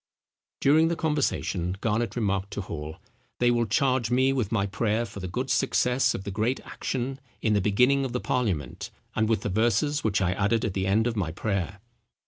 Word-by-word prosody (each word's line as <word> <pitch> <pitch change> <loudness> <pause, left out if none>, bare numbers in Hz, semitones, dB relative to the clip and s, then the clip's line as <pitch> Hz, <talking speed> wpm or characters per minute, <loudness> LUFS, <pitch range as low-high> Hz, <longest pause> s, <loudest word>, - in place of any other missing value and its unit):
During 155 +4 +5
the 170 - 0
conversation 130 - -1
Garnet 115 0 -1
remarked 100 -4 0
to - - -3
Hall, 80 -4 -6 0.4
"They 120 0 +3
will 120 -1 +1
charge 125 +1 +1
me 130 +2 +3
with 120 -6 -1
my 100 -4 +1
prayer 110 +2 0
for 110 -2 -9
the 95 - -4
good 125 +9 -3
success 130 -1 +2
of 95 - -5
the 100 - -5
great 110 +6 0
action, 130 +1 -3 0.2
in 110 - +3
the 100 - +3
beginning 125 +8 +3
of 130 - -2
the 125 - -1
parliament, 100 - -2 0.3
and 110 0 +1
with 110 -3 +2
the 105 - -2
verses 120 +8 +1
which 105 -2 +1
I 90 -2 +1
added 105 +4 +1
at 105 - -2
the 95 0 -1
end 110 +4 +3
of 120 -1 -1
my 90 -7 -1
prayer." 95 +2 -3
110 Hz, 200 wpm, -27 LUFS, 100-125 Hz, 0.4 s, During